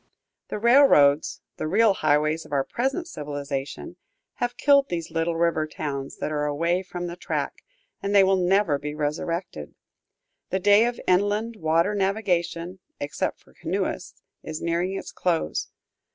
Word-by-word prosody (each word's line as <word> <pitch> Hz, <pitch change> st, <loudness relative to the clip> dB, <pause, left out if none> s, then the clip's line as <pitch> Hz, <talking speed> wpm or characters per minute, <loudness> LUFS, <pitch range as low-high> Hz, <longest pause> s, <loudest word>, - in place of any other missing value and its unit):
The -, -, -4 dB
railroads, 210 Hz, -, +5 dB, 0.2 s
the -, -, -3 dB
real 210 Hz, +5 st, +4 dB
highways 155 Hz, -1 st, +1 dB
of -, -, -16 dB
our 140 Hz, -2 st, +1 dB
present 270 Hz, -, -2 dB
civilization, 145 Hz, -, -5 dB, 0.4 s
have 245 Hz, 0 st, -2 dB
killed 280 Hz, -1 st, +4 dB
these 170 Hz, -2 st, -4 dB
little 165 Hz, +1 st, 0 dB
river 165 Hz, -2 st, +1 dB
towns 140 Hz, -3 st, -5 dB
that -, -, -3 dB
are 150 Hz, -1 st, -1 dB
away 170 Hz, +5 st, 0 dB
from 180 Hz, -1 st, -6 dB
the 175 Hz, 0 st, -5 dB
track, -, -, -4 dB, 0.4 s
and 200 Hz, +1 st, -1 dB
they 200 Hz, -, +8 dB
will 190 Hz, 0 st, +4 dB
never 185 Hz, -4 st, +2 dB
be 150 Hz, +1 st, -5 dB
resurrected. 150 Hz, -, -3 dB, 0.7 s
The 190 Hz, -, 0 dB
day 205 Hz, +4 st, +5 dB
of 240 Hz, -, -4 dB
inland 205 Hz, +5 st, +1 dB
water 165 Hz, +3 st, +2 dB
navigation, 185 Hz, -3 st, -1 dB, 0.2 s
except 145 Hz, -, -3 dB
for -, -, -23 dB
canoeists, -, -, -4 dB, 0.2 s
is 155 Hz, 0 st, -6 dB
nearing 175 Hz, +3 st, -1 dB
its -, -, -7 dB
close. 175 Hz, -3 st, -1 dB
170 Hz, 150 wpm, -25 LUFS, 155-200 Hz, 0.7 s, they